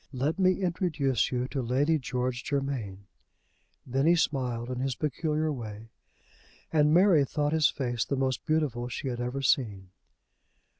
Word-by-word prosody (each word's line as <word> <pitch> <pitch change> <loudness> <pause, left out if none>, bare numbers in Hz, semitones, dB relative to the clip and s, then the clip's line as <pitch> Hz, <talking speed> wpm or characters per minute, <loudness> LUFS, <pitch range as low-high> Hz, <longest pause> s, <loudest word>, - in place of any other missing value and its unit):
Let 140 +8 -1
me 185 +1 +3
introduce 155 - 0
you 125 0 -1
to 135 - -2
Lady 140 +6 +1
George 125 -1 -2
Germain." 130 -9 -3 0.8
Then 135 +3 0
he 170 - +6
smiled 125 -6 -1
in 125 - -3
his 130 -1 -1
peculiar 155 +2 -1
way, 110 -3 -8 0.8
and 150 -1 +4
Mary 175 -3 +5
thought 145 +2 -1
his 155 -3 +4
face 120 -4 -2
the 140 - -2
most 130 -1 -1
beautiful 145 -7 0
she 130 +3 -4
had 120 -1 -4
ever 125 +3 -3
seen. 100 -9 0
135 Hz, 150 wpm, -28 LUFS, 125-155 Hz, 0.8 s, he